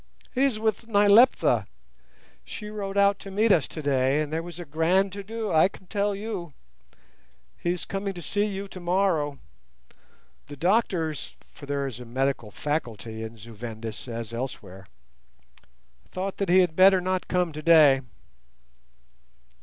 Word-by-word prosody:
"He 270 +1 +3
is 260 -6 +1
with 220 +1 -1
Nyleptha. 210 +3 +5 0.8
She 210 -1 -8
rode 200 -2 -4
out 200 0 +4
to 195 - -9
meet 210 +3 +2
us 165 -8 +3
today, 140 -2 0
and 155 0 -3
there 160 - 0
was 175 0 -9
a 175 - -6
grand 175 +6 +1
to 200 - -5
do, 220 +2 -4
I 160 +2 +5
can 190 - -15
tell 205 +1 -1
you. 195 -7 -5 1.0
He 175 - -1
is 180 - -6
coming 195 0 -4
to 175 - -7
see 205 +7 0
you 200 -1 -5
tomorrow; 175 -6 0 1.1
the 145 0 -10
doctors 175 - 0 0.2
(for 145 - -12
there 140 -1 -1
is 125 -4 -6
a 125 - -9
medical 130 -1 -1
'faculty' 115 -4 -4
in 110 +1 -7
Zu 115 +2 -12
Vendis 110 +1 -7
as 115 -1 -6
elsewhere) 95 -7 -6 1.2
thought 190 +1 -4
that 200 - -2
he 185 +1 +6
had 175 -3 0
better 190 +1 +6
not 185 0 -2
come 180 -2 0
today." 155 -3 +5
175 Hz, 155 wpm, -26 LUFS, 140-200 Hz, 1.2 s, he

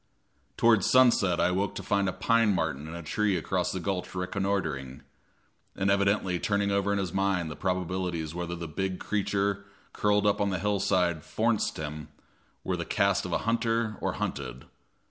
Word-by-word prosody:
Toward 110 -4 +4
sunset 115 -9 +4
I - - +3
awoke 95 +3 -1
to - - -5
find 100 -1 +1
a - - -1
pine 115 -2 +2
martin 80 -3 -2
in 80 - -7
a 85 - -7
tree 100 +4 +1
across 90 -2 -1
the 95 - -3
gulch 95 0 -3
reconnoitering, 90 -8 -2 0.7
and 100 0 +1
evidently 100 -2 +2
turning 100 +1 0
over 100 0 +1
in 100 - +1
his 95 -4 -2
mind 95 -4 0
the - - -6
probabilities 90 -3 -2
whether 85 0 -4
the 85 -1 -6
big 95 +3 -3
creature 100 -1 -1 0.3
curled 105 0 +2
up 105 0 +2
on 100 - +2
the 95 - -1
hillside 90 -4 +1
"forninst" 115 -1 0
him 75 0 -5 0.6
were - - -1
of - - -2
the - - -3
cast - - +1
of - - -6
hunter 115 -1 0
or - - -1
hunted. 65 -2 -4
95 Hz, 175 wpm, -28 LUFS, 85-100 Hz, 0.7 s, Toward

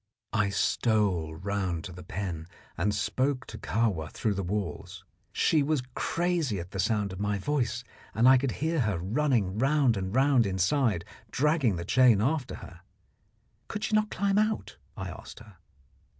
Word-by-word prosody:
I 105 -2 +2
stole 100 -7 +1
round 95 -2 -2
to 95 - -7
the 90 +1 -10
pen 90 -6 -5 0.3
and 95 +5 +1
spoke 130 +6 -1
to - - -9
Kahwa 100 -9 0
through 110 - -1
the 100 - -2
walls. 100 0 -4 0.3
She 155 - +3
was 145 -2 0
crazy 170 - 0
at 85 +1 -8
the 95 - -5
sound 105 -2 0
of 95 - -8
my 105 0 0
voice, 120 +1 -1 0.3
and 115 +3 +4
I 130 0 +7
could 135 -2 -1
hear 160 +1 -1
her 105 -7 +1
running 105 - 0
round 135 -2 +3
and 95 +2 -3
round 130 -4 +4
inside, 95 - +1 0.2
dragging 150 - +2
the 85 0 -5
chain 120 0 +5
after 130 +3 0
her. - - -14 0.9
Could 210 - -5
she 220 - -2
not 215 0 +2
climb 200 +1 +1
out? 215 +1 -1 0.2
I - - -4
asked - - -10
her. 110 -5 -14
110 Hz, 165 wpm, -28 LUFS, 95-140 Hz, 0.9 s, I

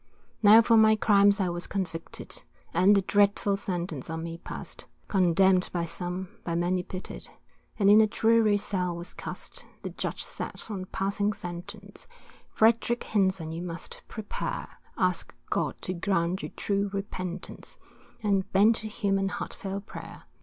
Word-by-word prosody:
Now 220 +2 +8
for 230 0 +5
my 220 0 +6
crimes 205 -1 +4
I 185 -2 +1
was 175 0 -4
convicted, 175 -4 -5 0.3
And 200 +3 +5
the 195 - +3
dreadful 200 0 +3
sentence 175 -7 -4
on 160 0 -4
me 165 0 -6
pass'd, - - -7 0.2
Condemn'd 185 0 +4
by 170 -2 -1
some, 180 +2 -4
by 170 - -2
many 175 +2 +1
pity'd, 185 +1 -7 0.5
And 200 - +3
in 210 +2 +8
a 215 - +4
dreary 220 -1 +3
cell 180 -3 -1
was 170 +1 -7
cast; - - -7 0.2
The - - -4
Judge - - -3
said - - -5
on 190 -3 -4
passing 200 +2 -1
sentence, 195 +2 -8 0.4
Frederick 230 +2 +3
Hinson 190 -6 +1
you 165 +1 -4
must 170 -1 -6
prepare, 215 -2 -4 0.3
Ask - - 0 0.2
God - - -1
to 185 - -2
grant 180 0 0
you - - -5
true 200 0 -1
repentance, 185 -3 -5 0.5
And 200 -2 +1
bend 215 +4 +5
to 215 - -5
him 200 -2 0
in 195 0 0
heartfelt 195 0 -5
prayer. - - -9
195 Hz, 155 wpm, -28 LUFS, 180-205 Hz, 0.5 s, Now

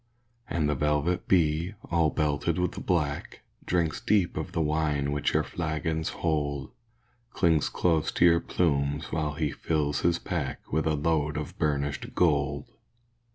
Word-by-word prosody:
And 80 -3 0
the 75 - +1
velvet 75 +5 0
bee, 85 +2 +2 0.2
all 85 -2 +3
belted 75 +2 0
with 90 0 -2
black, 75 -6 -1 0.3
Drinks 85 -3 0
deep 100 -5 +2
of 80 +3 -4
the 90 - -2
wine 75 -2 0
which 75 0 0
your - - +3
flagons 80 -1 -2
hold, 70 -4 -2 0.6
Clings 80 -4 +2
close 80 -3 +1
to - - +4
your 85 -1 +6
plumes 70 -5 0
while 75 -2 -1
he 75 -2 -1
fills 75 -2 -1
his 85 0 +2
pack - - -4
With 80 +1 +1
a 80 - +2
load 75 0 0
of 75 -2 -5
burnished 70 -2 -1
gold. 75 -4 +1
75 Hz, 150 wpm, -28 LUFS, 75-85 Hz, 0.6 s, your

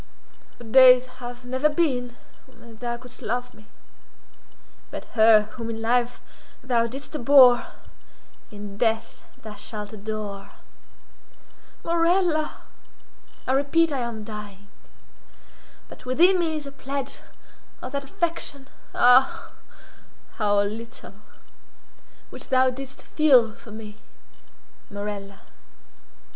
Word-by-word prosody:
"The - - -12
days 255 +2 +7 0.2
have 245 0 -8
never 260 +4 +1
been 260 -6 -1 0.3
when 235 -3 -16
thou 240 0 -4
couldst 250 +1 -12
love 245 +2 -3
me—but 215 - -17
her 220 -1 +6
whom 230 +1 -7
in 225 -1 -5
life 240 +2 0 0.4
thou 235 -3 +1
didst 270 +5 -9
abhor, 255 -3 +6 0.8
in 205 -1 -10
death 225 -1 -1 0.2
thou 215 -1 -8
shalt 210 +1 -8
adore." 210 -1 -6 1.3
"Morella!" 335 -2 +1 0.8
"I - - -1
repeat 295 +4 +2
that 270 -3 -2
I - - -1
am 220 -2 -7
dying. 205 -2 -10 1.2
But - - -14
within 355 +9 +4
me 325 -2 0
is 300 -2 -5
a 280 - -8
pledge 275 0 -5 0.6
of - - -7
that 280 0 -3
affection—ah, 270 -5 +1 0.9
how 205 -2 +2
little!—which 215 -1 -12
thou 260 0 +3
didst 270 +1 -9
feel 255 -8 +4
for 230 - -16
me, 215 -1 -10 0.9
Morella. 200 -1 -7
245 Hz, 105 wpm, -24 LUFS, 215-275 Hz, 1.3 s, days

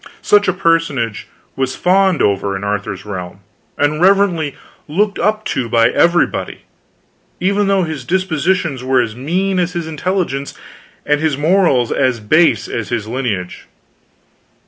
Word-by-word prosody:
Such 205 0 +4
a 185 - +2
personage 150 - 0 0.3
was 130 -1 -2
fawned 190 -1 +2
upon 100 -1 0
in 95 - -5
Arthur's 100 -1 -3
realm 95 -2 -7 0.4
and 150 +2 0
reverently 180 -6 +2 0.3
looked 200 +7 0
up 215 +1 0
to 120 -3 -2
by 115 0 +4
everybody, 170 0 +1 0.8
even 200 +2 +1
though 195 -1 +2
his 155 -5 -5
dispositions 170 -3 -1
were 130 0 +2
as 115 -3 -1
mean 180 +9 -1
as 180 0 -1
his 170 -2 -3
intelligence, 160 -3 -3 0.5
and 150 0 +1
his 155 -4 0
morals 150 -6 +2
as 130 -3 +1
base 155 +11 +2
as 115 - -4
his 115 -3 -3
lineage. 110 -7 -4
150 Hz, 140 wpm, -16 LUFS, 120-185 Hz, 0.8 s, Such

